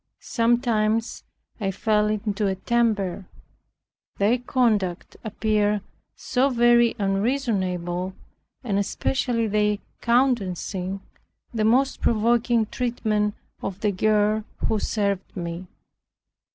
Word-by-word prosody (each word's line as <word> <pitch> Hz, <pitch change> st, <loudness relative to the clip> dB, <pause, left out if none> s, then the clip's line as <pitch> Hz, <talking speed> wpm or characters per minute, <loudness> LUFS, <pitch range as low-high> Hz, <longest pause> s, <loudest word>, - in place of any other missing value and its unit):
Sometimes 230 Hz, -2 st, +1 dB, 0.4 s
I 200 Hz, -3 st, -1 dB
fell 210 Hz, +2 st, +1 dB
into 210 Hz, -1 st, -1 dB
a 190 Hz, -, 0 dB
temper, 205 Hz, -4 st, 0 dB, 0.9 s
their 220 Hz, +5 st, +2 dB
conduct 215 Hz, -8 st, 0 dB
appeared 210 Hz, -1 st, 0 dB, 0.3 s
so 265 Hz, +1 st, +1 dB
very 240 Hz, -1 st, +4 dB
unreasonable, 195 Hz, -4 st, -1 dB, 0.5 s
and 200 Hz, -5 st, 0 dB
especially 230 Hz, +3 st, 0 dB
their 210 Hz, -1 st, +1 dB, 0.2 s
countenancing 195 Hz, -6 st, 0 dB, 0.5 s
the 220 Hz, -2 st, 0 dB
most 260 Hz, +5 st, +2 dB
provoking 235 Hz, +1 st, +2 dB
treatment 215 Hz, -3 st, -1 dB, 0.3 s
of 195 Hz, +1 st, -5 dB
the 210 Hz, -2 st, +2 dB
girl 210 Hz, +2 st, +2 dB, 0.2 s
who 220 Hz, -, +1 dB
served 200 Hz, -2 st, -2 dB
me. 170 Hz, +1 st, -5 dB
215 Hz, 95 wpm, -24 LUFS, 195-235 Hz, 0.9 s, very